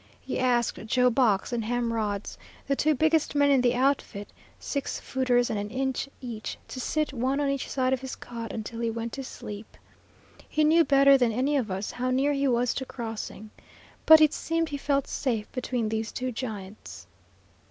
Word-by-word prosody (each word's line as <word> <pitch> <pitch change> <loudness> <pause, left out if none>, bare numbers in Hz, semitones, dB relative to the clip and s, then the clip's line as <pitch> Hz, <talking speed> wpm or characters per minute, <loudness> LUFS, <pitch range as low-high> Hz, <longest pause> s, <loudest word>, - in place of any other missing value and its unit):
He - - -4
asked 245 -3 +1
Joe 250 +2 +3
Box 225 -3 +2
and 235 -2 -1
Ham 235 +1 -1
Rhodes, 210 -3 -2 0.3
the 275 - +1
two 305 +2 +2
biggest 315 +1 +2
men 285 0 +4
in 270 -2 +4
the 245 0 +2
outfit, 255 -6 0 0.3
six 280 -1 -3
footers 250 -2 +1
and 215 - -1
an 205 +1 -4
inch 265 +2 -2
each, 230 -4 -6
to 255 - -6
sit 305 +3 -1
one 260 +3 0
on 285 -1 +1
each 275 -1 -3
side 260 -1 +1
of 260 - -1
his 265 -1 -6
cot 230 -2 -7
until 230 +1 -6
he 230 -1 0
went 230 0 -4
to 270 - -5
sleep. 210 -4 -9 0.7
He 310 - +1
knew 325 +2 +5
better 275 -2 +6
than 245 -2 +3
any 260 +6 0
of 250 -6 0
us 195 +2 -3
how 255 +1 -2
near 270 +3 +2
he 280 0 +1
was 245 -1 +2
to 265 - -4
crossing. 225 -4 -7 0.6
But 315 0 +10
it 305 -1 +5
seemed 330 0 -1
he 285 - -3
felt 280 -1 0
safe 225 -6 -2
between 250 -3 -2
these 220 0 -2
two 255 0 -3
giants. 210 - -7
255 Hz, 195 wpm, -27 LUFS, 230-275 Hz, 0.7 s, But